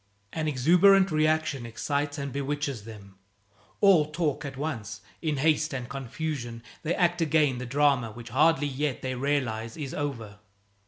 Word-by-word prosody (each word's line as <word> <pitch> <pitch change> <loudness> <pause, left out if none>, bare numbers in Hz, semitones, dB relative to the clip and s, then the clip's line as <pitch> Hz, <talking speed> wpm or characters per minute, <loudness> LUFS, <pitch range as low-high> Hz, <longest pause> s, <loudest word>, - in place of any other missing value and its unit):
An 160 -1 -2
exuberant 180 +7 +5
reaction 155 -3 +1
excites 145 +6 -2
and 140 -1 -4
bewitches 140 -4 -3
them. 100 -4 -12 0.6
All 185 -7 +6
talk 150 -2 -1
at 140 -2 -6
once. 110 -8 -4 0.2
In 155 -3 -1
haste 155 0 +2
and 125 -2 -4
confusion 135 -2 -5 0.2
they 170 +2 -1
act 175 -1 +1
again 150 -5 +2
the 125 - -5
drama 140 -3 +2
which 120 +2 -10
hardly 150 +3 +3
yet 145 -1 -2
they 130 0 -2
realize 125 -4 -2
is 145 -4 -5
over. 115 -8 -4
140 Hz, 150 wpm, -27 LUFS, 125-155 Hz, 0.6 s, All